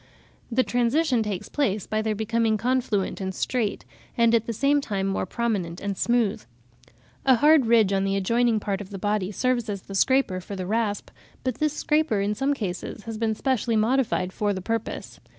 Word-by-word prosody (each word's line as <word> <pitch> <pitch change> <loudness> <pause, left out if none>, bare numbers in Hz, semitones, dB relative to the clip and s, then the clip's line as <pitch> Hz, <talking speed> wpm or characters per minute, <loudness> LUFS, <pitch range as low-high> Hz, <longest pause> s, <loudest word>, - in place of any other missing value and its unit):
The 255 +3 +3
transition 245 +2 +1
takes 205 -4 -3
place 215 -9 -1
by 215 0 -1
their 220 -1 -1
becoming 220 +1 +1
confluent 225 -5 0
and 190 0 -3
straight, 230 -5 -1 0.3
and 230 -1 +4
at 230 -1 +2
the - - -1
same 280 +5 +2
time 200 -7 -2
more 195 -1 -1
prominent 195 -7 -2
and 200 -1 -3
smooth. 235 - +1 0.8
A 260 -1 +5
hard 295 0 +5
ridge 220 -4 +4
on 195 0 +1
an 195 - 0
adjoining 230 +3 +2
part 200 -1 -2
of 195 - -9
the 200 - -6
body 205 -1 -1
serves 240 +1 0
as 200 -2 -4
the 195 - -10
scraper 195 -3 +2
for 200 +2 -7
the 185 -1 -4
rasp, 210 0 -1 0.3
but 255 -1 -2
this 305 -1 +1
scraper 300 -8 +1
in 200 +1 0
some 270 +6 0
cases 200 -1 -5
has 225 -1 -6
been 220 -1 0
specially 240 -1 0
modified 220 -4 +1
for 205 -1 0
the 190 - -4
purpose. 230 +4 -4
220 Hz, 190 wpm, -25 LUFS, 200-245 Hz, 0.8 s, A